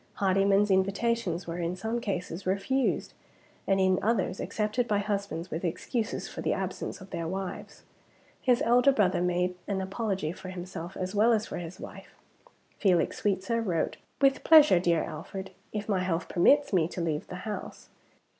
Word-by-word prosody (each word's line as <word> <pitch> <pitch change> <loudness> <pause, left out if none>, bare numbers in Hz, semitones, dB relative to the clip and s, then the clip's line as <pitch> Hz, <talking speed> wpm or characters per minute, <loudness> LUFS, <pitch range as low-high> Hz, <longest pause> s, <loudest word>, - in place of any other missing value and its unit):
Hardyman's 195 +1 +3
invitations 195 -1 +1
were 170 +1 -5
in 170 +1 -1
some 225 +5 -3
cases 185 -3 -4
refused; 200 +8 0 0.5
and 195 -1 +3
in 185 -1 +3
others 195 -4 0
accepted 215 +3 -1
by 210 - +2
husbands 200 -4 -3
with 160 +3 -3
excuses 215 +6 -2
for - - -7
the - - +1
absence - - -4
of 190 - -12
their 165 -1 -3
wives. 190 +2 -6 0.6
His 250 -2 +3
elder 245 +4 +5
brother 195 -8 +2
made 180 0 +1
an 200 -2 -1
apology 190 -4 -2
for 185 +1 -9
himself 180 -1 -7
as 185 +1 -3
well 215 +3 +4
as 215 -1 +1
for - - -6
his 170 +1 -8
wife. - - -10 0.6
Felix 185 -5 +2
Sweetsir 210 +3 0
wrote, 170 -6 -1 0.2
"With 275 -1 +3
pleasure, 305 - +7
dear 170 -2 +2
Alfred, 190 +5 -7 0.2
if 210 -1 -4
my 200 -3 +1
health 180 -2 -1
permits 280 +9 +4
me 170 -4 +3
to 180 - -7
leave 160 -3 -2
the 180 - -7
house." 215 -1 -6
190 Hz, 165 wpm, -28 LUFS, 180-215 Hz, 0.6 s, pleasure